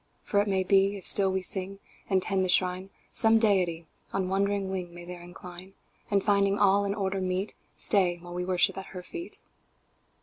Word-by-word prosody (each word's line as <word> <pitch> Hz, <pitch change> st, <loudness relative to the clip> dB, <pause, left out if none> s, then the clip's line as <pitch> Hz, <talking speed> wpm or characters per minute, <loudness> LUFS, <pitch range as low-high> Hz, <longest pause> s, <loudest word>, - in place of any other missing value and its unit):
"For 200 Hz, -, +1 dB
it 205 Hz, -, -3 dB
may 190 Hz, -1 st, 0 dB
be, 195 Hz, +1 st, +2 dB
if 190 Hz, -, -10 dB
still 195 Hz, -2 st, +7 dB
we 190 Hz, 0 st, -2 dB
sing 195 Hz, 0 st, -5 dB, 0.3 s
And 190 Hz, -2 st, +2 dB
tend 195 Hz, -1 st, 0 dB
the 185 Hz, -, -2 dB
Shrine, 185 Hz, +1 st, +1 dB, 0.2 s
Some 225 Hz, 0 st, +4 dB
Deity 185 Hz, -7 st, +1 dB, 0.3 s
on 190 Hz, -1 st, -2 dB
wandering 195 Hz, 0 st, -1 dB
wing 180 Hz, -2 st, -5 dB
May 175 Hz, 0 st, -10 dB
there 175 Hz, 0 st, -9 dB
incline; 180 Hz, +1 st, -12 dB, 0.4 s
And, 200 Hz, -2 st, +1 dB
finding 200 Hz, -1 st, +2 dB
all 200 Hz, 0 st, +3 dB
in 200 Hz, 0 st, -2 dB
order 195 Hz, -2 st, -2 dB
meet, 185 Hz, +2 st, -3 dB, 0.2 s
Stay 180 Hz, -4 st, +3 dB
while 175 Hz, 0 st, -11 dB
we 180 Hz, 0 st, -3 dB
worship 180 Hz, +1 st, +1 dB
at 190 Hz, -, -9 dB
Her 180 Hz, -, -7 dB
feet." 345 Hz, -, -9 dB
190 Hz, 195 wpm, -27 LUFS, 180-200 Hz, 0.4 s, still